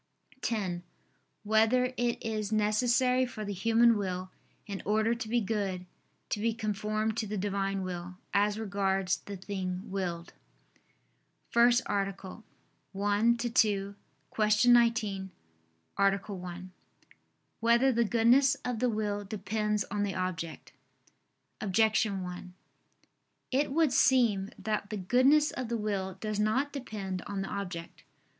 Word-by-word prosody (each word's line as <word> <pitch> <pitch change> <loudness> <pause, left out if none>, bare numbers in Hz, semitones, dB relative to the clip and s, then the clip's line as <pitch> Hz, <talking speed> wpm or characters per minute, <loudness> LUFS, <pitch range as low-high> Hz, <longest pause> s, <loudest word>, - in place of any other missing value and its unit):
(10) 195 -8 -2 0.6
Whether 225 +4 +3
it 240 -1 0
is 215 -2 -2
necessary 240 +4 +2
for 235 -4 -5
the 205 - -3
human 230 +4 +4
will, 185 -2 -3 0.3
in 200 -2 -5
order 220 +2 +2
to 230 -2 -5
be 240 +1 +2
good, 195 -4 -2 0.4
to 210 - -1
be 225 +1 0
conformed 215 0 -1
to 220 - -1
the 210 +1 -3
Divine 195 0 -1
Will, 180 0 -5 0.2
as 205 +1 +2
regards 195 -3 0
the 200 -1 -8
thing 185 -1 -5
willed? 175 -3 -4 0.5
________________________ - - -40 0.7
FIRST 240 +1 +5
ARTICLE 195 +1 -3 0.6
[I 205 0 +1 0.3
II, 240 - -1 0.4
Q. - - -28 0.7
19, 225 -6 +3 0.7
Art. 195 0 +2
1] 180 -1 -7 0.9
Whether 235 +3 +4
the 235 -1 +2
Goodness 240 +5 +4
of 245 -3 -2
the 250 +1 +2
Will 210 -2 -2
Depends 210 +1 -1
on 205 0 -1
the 200 -1 -1
Object? 175 -3 -4 0.9
Objection 215 -1 +2
1: 180 0 -8 1.0
It 270 +2 +1
would 310 -2 +2
seem 225 -9 +3
that 205 0 -3
the 215 - -3
goodness 260 +10 +4
of 255 -3 -5
the 235 - -1
will 195 -3 -2
does 210 +1 -4
not 260 +7 +1
depend 200 -9 -5
on 195 -1 -3
the - - -6
object. 180 -4 -6
210 Hz, 130 wpm, -30 LUFS, 195-230 Hz, 1.0 s, FIRST